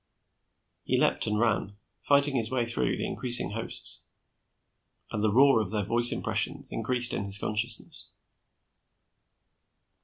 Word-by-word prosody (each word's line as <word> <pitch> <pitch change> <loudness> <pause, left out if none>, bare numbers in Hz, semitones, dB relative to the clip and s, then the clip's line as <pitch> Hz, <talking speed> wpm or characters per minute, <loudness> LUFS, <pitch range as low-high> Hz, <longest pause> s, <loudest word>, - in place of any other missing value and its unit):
He - - -2
leaped - - -1
and 105 -1 -2
ran, 105 -3 -2 0.2
fighting 140 0 +3
his 115 -3 -1
way 130 -2 -2
through 65 - -3
the - - -5
increasing 120 -4 +3
hosts, 115 +2 -4 1.1
and 105 - -5
the 110 - 0
roar 135 0 +3
of 100 - -6
their 105 0 -3
voice 120 +4 +5
impressions - - -2
increased 120 +2 +2
in 100 - -4
his 100 0 +1
consciousness. 110 +3 -3
115 Hz, 130 wpm, -26 LUFS, 105-120 Hz, 1.1 s, voice